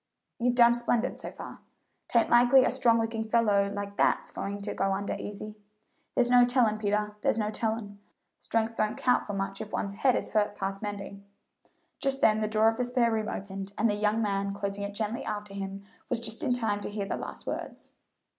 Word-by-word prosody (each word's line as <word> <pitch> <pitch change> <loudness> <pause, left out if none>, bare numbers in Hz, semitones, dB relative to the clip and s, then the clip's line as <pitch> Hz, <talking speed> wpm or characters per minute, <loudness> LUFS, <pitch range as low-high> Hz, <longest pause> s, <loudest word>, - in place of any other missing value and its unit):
"You've 245 +1 +2
done 235 -1 +7
splendid, 240 0 0
so - - -6
far. - - -9 0.5
'Tain't 235 -1 +2
likely 245 +2 +7
a - - +2
strong 230 -1 +3
looking 225 0 -1
fellow 215 -3 +2
like 200 0 -5
that's - - +2
going 200 +1 -4
to 205 - -4
go 195 - 0
under 200 +1 -2
easy." 210 +1 -6 0.6
"There's 245 -2 +3
no 245 0 +7
tellin', 245 -3 +3
Peter 210 0 -1
there's - - +1
no 210 -1 0
tellin'; 220 -2 -3 0.4
strength 225 0 -1
don't 215 -1 0
count 250 -1 +2
for 205 - -4
much 195 0 -3
if 215 - -7
one's 200 - -2
head 255 +5 +2
is - - -2
hurt 210 -1 +1
past 195 0 -3
mending." 200 -1 -6 0.8
Just 270 0 0
then 215 -4 +4
the 215 - 0
door 215 +1 +3
of 225 0 +2
the 250 - 0
spare 245 -1 +2
room 220 -1 -1
opened, 195 0 -6
and 225 - +3
the 210 - +1
young 210 +2 +1
man, 200 -1 -1
closing 200 0 -4
it 200 0 -5
gently 220 +2 -2
after 210 -2 -5
him, 195 0 -5 0.3
was 245 - 0
just 225 -1 -3
in - - +1
time 220 -4 0
to - - -4
hear 205 -1 -3
the - - -2
last - - -7
words. - - -6
215 Hz, 210 wpm, -28 LUFS, 200-230 Hz, 0.8 s, done